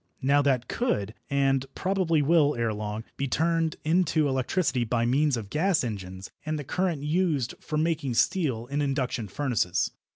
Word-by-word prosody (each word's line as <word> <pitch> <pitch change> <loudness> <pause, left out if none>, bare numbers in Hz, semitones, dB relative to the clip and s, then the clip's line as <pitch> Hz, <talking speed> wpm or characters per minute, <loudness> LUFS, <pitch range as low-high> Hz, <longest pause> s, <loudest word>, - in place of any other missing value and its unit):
Now 140 +2 +4
that 130 -4 +1
could, 110 - -1 0.2
and 135 -1 +2
probably 180 -5 +1
will 150 -1 +4
ere 115 -2 0
long, 105 +1 -4
be 140 - -1
turned 165 +3 +1
into 160 -2 +2
electricity 130 0 0
by 115 0 0
means 135 +2 +2
of 105 -3 -7
gas 175 +1 +2
engines 95 -4 -6
and 155 0 -2
the 145 - -4
current 170 0 -1
used 150 -5 0
for 155 - -4
making 155 -6 0
steel 130 -7 +1
in 140 +3 -2
induction 130 -5 -1
furnaces. 105 -8 0
140 Hz, 160 wpm, -27 LUFS, 120-160 Hz, 0.2 s, Now